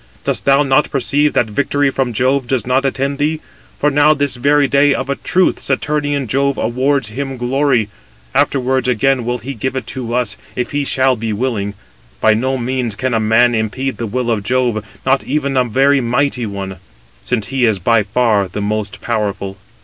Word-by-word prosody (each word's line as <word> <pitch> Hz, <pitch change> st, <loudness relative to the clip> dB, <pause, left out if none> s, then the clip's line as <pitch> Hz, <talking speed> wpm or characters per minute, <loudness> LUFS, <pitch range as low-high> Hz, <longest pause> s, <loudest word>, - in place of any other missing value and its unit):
Dost -, -, -2 dB
thou 140 Hz, +1 st, +5 dB
not 140 Hz, +1 st, +2 dB
perceive 145 Hz, +2 st, +1 dB
that -, -, +2 dB
victory 140 Hz, +5 st, 0 dB
from 130 Hz, -2 st, -1 dB
Jove 130 Hz, +3 st, +1 dB
does 130 Hz, -1 st, -1 dB
not 130 Hz, +2 st, +1 dB
attend 140 Hz, +1 st, -1 dB
thee? 155 Hz, +2 st, 0 dB, 0.4 s
For 150 Hz, -, +1 dB
now, 145 Hz, +2 st, +4 dB
this 145 Hz, -2 st, 0 dB
very 140 Hz, +3 st, +3 dB
day, 140 Hz, +1 st, +3 dB
of 140 Hz, -, -3 dB
a -, -, 0 dB
truth, 185 Hz, +5 st, +1 dB
Saturnian 145 Hz, -2 st, -1 dB
Jove 140 Hz, +4 st, 0 dB
awards 130 Hz, +1 st, 0 dB
him 135 Hz, +3 st, -5 dB
glory; 125 Hz, -2 st, +1 dB, 0.5 s
afterwards 130 Hz, -1 st, +1 dB
again 125 Hz, +1 st, +1 dB
will 120 Hz, +1 st, -1 dB
he 135 Hz, +3 st, -6 dB
give 130 Hz, +2 st, -3 dB
it 130 Hz, -3 st, -3 dB
to 120 Hz, -2 st, -5 dB
us, 120 Hz, -4 st, -1 dB, 0.2 s
if 125 Hz, -, -3 dB
he 145 Hz, -1 st, -1 dB
shall 130 Hz, -1 st, +2 dB
be 110 Hz, -1 st, -3 dB
willing. 105 Hz, -3 st, -2 dB, 0.4 s
By 110 Hz, -, +4 dB
no 130 Hz, +4 st, 0 dB
means 125 Hz, -3 st, -2 dB
can 130 Hz, +3 st, -2 dB
a 115 Hz, -, +2 dB
man 115 Hz, +3 st, +3 dB
impede 120 Hz, +4 st, -2 dB
the 115 Hz, -, -3 dB
will 120 Hz, +2 st, -1 dB
of 110 Hz, -3 st, 0 dB
Jove, 120 Hz, -1 st, 0 dB, 0.2 s
not 135 Hz, +1 st, +2 dB
even 140 Hz, -1 st, -1 dB
a 130 Hz, -1 st, +3 dB
very 135 Hz, +4 st, +3 dB
mighty 125 Hz, 0 st, 0 dB
one; 95 Hz, -2 st, -6 dB, 0.4 s
since 110 Hz, -3 st, -2 dB
he 135 Hz, -2 st, +1 dB
is 110 Hz, -3 st, +2 dB
by 115 Hz, +5 st, +2 dB
far 105 Hz, -1 st, +1 dB
the 90 Hz, -, -6 dB
most 105 Hz, 0 st, -3 dB
powerful." 100 Hz, -4 st, -2 dB
130 Hz, 190 wpm, -16 LUFS, 115-140 Hz, 0.5 s, thou